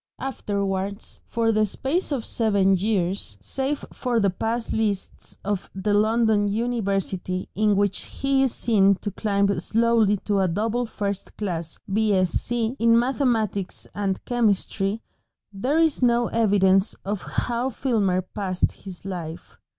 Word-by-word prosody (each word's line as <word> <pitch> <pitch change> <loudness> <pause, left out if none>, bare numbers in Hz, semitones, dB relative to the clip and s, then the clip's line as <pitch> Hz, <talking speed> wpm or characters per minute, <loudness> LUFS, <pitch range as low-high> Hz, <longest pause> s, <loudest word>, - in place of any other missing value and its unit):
Afterwards, 200 -5 -3
for 230 -1 +1
the 215 -1 +3
space 295 - -1
of 260 -6 -1
seven 200 -4 +2
years, 190 - -1
save 270 - -2
for 245 -3 0
the 200 -3 +2
pass 225 +5 -2
lists 210 -3 -2
of 200 -2 -2
the 195 +2 0
London 215 0 +3
University, 200 -5 -1
in 210 0 +2
which 200 -1 0
he 275 0 0
is 265 -2 +3
seen 200 -5 +3
to 205 +2 -5
climb 200 -2 +1
slowly 225 +1 +3
to 205 -2 +1
a 190 - +3
double 225 +7 -1
first 200 -3 -4
class 170 -6 -3 0.2
B.Sc., 200 -2 +1
in 230 0 +2
mathematics 235 -6 0
and 195 -2 -2
chemistry, 215 -2 0 0.5
there 255 +10 0
is 325 -4 +3
no 240 -1 +3
evidence 195 -3 +3
of 200 0 -2
how 240 +2 -1
Filmer 210 -8 0
passed 185 -1 -1
his 190 -2 -11
life. 170 -4 -7
210 Hz, 135 wpm, -24 LUFS, 195-235 Hz, 0.5 s, the